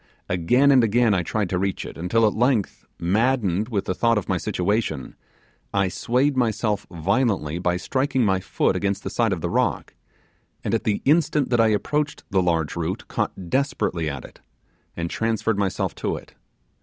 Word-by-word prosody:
Again 125 +11 +3
and 130 -3 +6
again 115 0 +3
I 90 - +2
tried 100 +4 -1
to 90 - 0
reach 95 0 -2
it, - - -8
until 100 +7 +1
at 105 - +2
length, 120 -3 0
maddened 105 +1 +1
with 100 -4 -1
the - - -1
thought 115 +4 +2
of 105 - -2
my 95 - +1
situation, 90 - -1 0.6
I 100 -1 +2
swayed 130 +8 +1
myself 110 -4 0
violently 90 - 0
by 90 0 0
striking 130 +4 0
my 95 -2 +2
foot - - 0
against 100 0 -1
the - - -4
side 115 -3 +1
of 90 -4 -2
the - - -2
rock, - - 0 0.7
and - - -2
at - - 0
the 105 - 0
instant 150 -2 +2
that 120 -1 +4
I 115 - +5
approached 145 +7 -1
the 95 -1 +3
large 85 -4 0
root 85 +1 -3
caught 90 -3 -3
desperately 110 - 0
at 70 -3 -6
it, - - -16 0.6
and 85 0 -2
transferred 115 +1 -1
myself 95 -2 -1
to - - -1
it. - - -11
105 Hz, 180 wpm, -23 LUFS, 90-120 Hz, 0.7 s, and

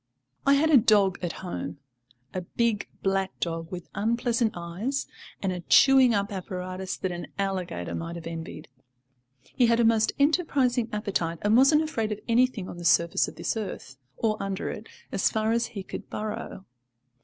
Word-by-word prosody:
I 280 - +7
had 315 +3 +3
a 290 - +8
dog 205 -5 +4
at 175 -2 -2
home, 175 - -5 0.6
a 185 - -2
big 220 +3 -1 0.2
black 195 0 0
dog 165 -1 -3
with 180 -2 -6
unpleasant 230 +1 +1
eyes, 185 +11 -3 0.4
and 190 - +1
a 180 - -3
chewing 260 - +6
up 200 -1 0
apparatus 185 0 -5
that 185 - -2
an 175 0 -6
alligator 185 - -3
might 170 +1 -4
have 170 - -8
envied. 165 -2 -7 0.9
He 245 - +4
had 230 0 +3
a - - +4
most 225 -1 +3
enterprising 280 -6 +2
appetite, 195 -6 -1
and 210 +2 +4
wasn't 275 +5 +6
afraid 225 -9 -2
of 210 - -3
anything 235 -4 +2
on - - -8
the - - -7
surface 170 0 +3
of - - -9
this - - -2
earth 190 -10 -6 0.2
or 215 -2 0
under 195 -1 -3
it - - -9 0.2
as - - +2
far 220 0 0
as 235 +1 +1
he 200 -5 -7
could - - -8
burrow. 210 -2 -5
205 Hz, 175 wpm, -27 LUFS, 180-235 Hz, 0.9 s, a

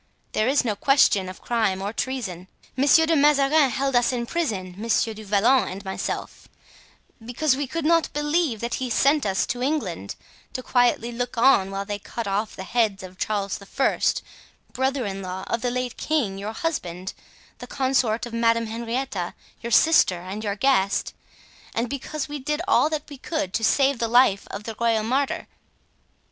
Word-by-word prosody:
There 215 - +1
is 275 +2 +3
here 230 - 0
no - - -3
question 205 -7 +3
of 185 - -11
crime 220 -5 0
or 200 +2 -4
treason. 215 -10 -4 0.3
Monsieur 285 +4 +5
de 325 0 +2
Mazarin 290 0 +4
held 270 +1 -1
us 245 +1 +3
in 240 -2 -2
prison, 215 - -2
Monsieur 225 +2 0
du 215 0 -10
Vallon 210 +3 +3
and 195 +2 -7
myself, 190 - -5 0.8
because 255 +4 +1
we 280 0 -3
could 325 +3 -3
not 330 0 +3
believe 295 -5 0
that 235 +1 -3
he - - 0
had 245 - -2
sent 280 0 +3
us 195 0 +1
to 245 - -4
England 230 - -2 0.4
to 255 - -4
quietly 240 -2 +2
look 245 +1 -4
on 230 -6 +4
while 195 0 -4
they 205 0 -4
cut 230 +3 -6
off 205 +3 -2
the 190 - -6
head 215 -2 0
of 185 0 -11
Charles 200 -2 -2
I., 265 +7 -1 0.7
brother 265 0 0
in 195 -1 -4
law 185 0 -5
of 230 - -2
the 245 - 0
late 250 0 -3
king, 235 -12 -1
your 210 +2 -5
husband, 185 - -3 0.5
the - - -8
consort 255 -4 0
of 240 - -9
Madame 230 0 +2
Henrietta, 230 -4 -3 0.3
your 235 - -5
sister 240 - +5
and 190 +4 -6
your 200 -2 -2
guest, 205 -5 +1 0.6
and 230 +2 0
because 280 +3 -4
we 295 0 -5
did 300 +4 -2
all 345 -5 +4
that 310 -2 -3
we 285 -3 -11
could 300 - -3
do - - +1
to - - -8
save 275 +2 +3
the 230 - 0
life 235 -4 +4
of 205 - -6
the 225 0 -6
royal 230 -2 +2
martyr. 265 +5 -1
235 Hz, 185 wpm, -24 LUFS, 200-275 Hz, 0.8 s, Monsieur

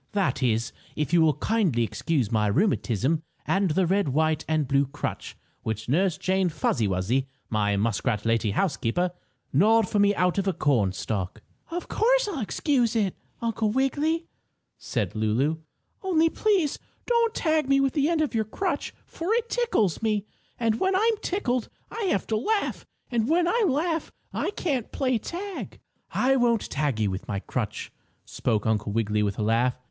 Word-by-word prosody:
"That 195 -7 0
is, 115 -3 +1 0.2
if 150 +2 -2
you 170 - +6
will 155 -3 +4
kindly 170 - +1
excuse 130 0 -1
my 105 -2 +2
rheumatism, 145 - +1 0.2
and 195 -1 +2
the 180 +4 +2
red, 195 -1 +1
white 155 +2 +1
and 155 -3 +1
blue 140 0 +2
crutch 140 - -5 0.2
which 110 0 -4
Nurse 175 +6 +2
Jane 190 -1 +1
Fuzzy 120 -7 0
Wuzzy, 100 +9 0 0.2
my 105 -2 +1
muskrat 105 +1 0
lady 115 -1 +2
housekeeper, 175 - 0 0.4
gnawed 215 +8 +4
for 205 - 0
me 205 0 +4
out 180 +2 +2
of 195 - -1
a 190 - +2
cornstalk." 105 - -1 0.3
"Of 350 +1 -4
course, - - +2
I'll 365 -9 -3
excuse 240 +1 +1
it, 205 -5 +1 0.3
Uncle 225 -1 0
Wiggily," 290 +7 +1 0.5
said 105 -8 -2
Lulu. 115 +9 +1 0.4
"Only 330 -4 +2
please 390 -9 +1 0.3
don't 470 -1 +2
tag 310 -4 +1
me 275 0 +5
with 275 -1 +2
the 295 +1 +2
end 330 -2 +2
of 300 - 0
your 220 -1 +1
crutch, 370 - -3
for 340 +5 -4
it 470 0 -1
tickles 455 - +1
me, 215 -2 0 0.3
and 225 -2 +1
when 380 0 +2
I'm 440 +3 +3
tickled 255 - -1 0.2
I 455 - -3
have 275 - +1
to 220 - 0
laugh, 420 - -1 0.2
and 235 0 +1
when 340 +2 +3
I 455 +3 +2
laugh 320 +2 0 0.2
I - - -1
can't 285 - -2
play 255 -4 0
tag." 380 - -6 0.3
"I 270 +1 +2
won't 235 -3 +1
tag 140 -6 0
you 105 -3 +1
with 95 - -5
my 100 - -2
crutch," 105 0 -4 0.3
spoke 110 -4 -1
Uncle 105 -2 0
Wiggily 105 -1 0
with 100 -2 -1
a 110 - -1
laugh. 120 +4 +1
195 Hz, 170 wpm, -26 LUFS, -, 0.5 s, you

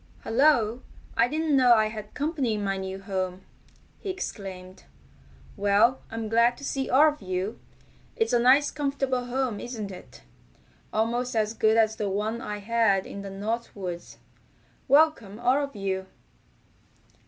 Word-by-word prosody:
"Hello! 240 -2 +3 0.3
I 230 - +4
didn't 310 +2 0
know 250 -3 +6
I 215 -1 +2
had 215 -1 -9
company 285 -6 -1
in 210 - -3
my 195 -1 0
new 190 0 -5
home!" 185 -1 -3 0.6
he 400 - -6
exclaimed. 190 - -7 0.7
"Well, 205 +5 +3
I'm 225 -1 -4
glad 235 +2 +3
to - - -12
see 270 -1 -2
all 295 +4 +6
of 300 -4 -7
you. 185 +3 -3 0.6
It's 450 - 0
a 240 - +5
nice 265 +4 +5
comfortable 275 -3 -1
home, 245 -3 -2
isn't 220 -5 -5
it? 185 - -12 0.7
Almost 235 +3 -1
as 215 0 +1
good 220 0 +3
as 220 -1 +3
the 210 -3 -1
one 215 +4 -2
I 210 - -4
had 205 -2 +2
in 200 - -7
the 200 - -7
North 215 +5 -4
Woods. 180 -3 -6 0.7
Welcome 275 -8 +3
all 255 +4 +2
of 280 -3 -6
you!" 190 -1 -3
225 Hz, 155 wpm, -26 LUFS, 200-260 Hz, 0.7 s, know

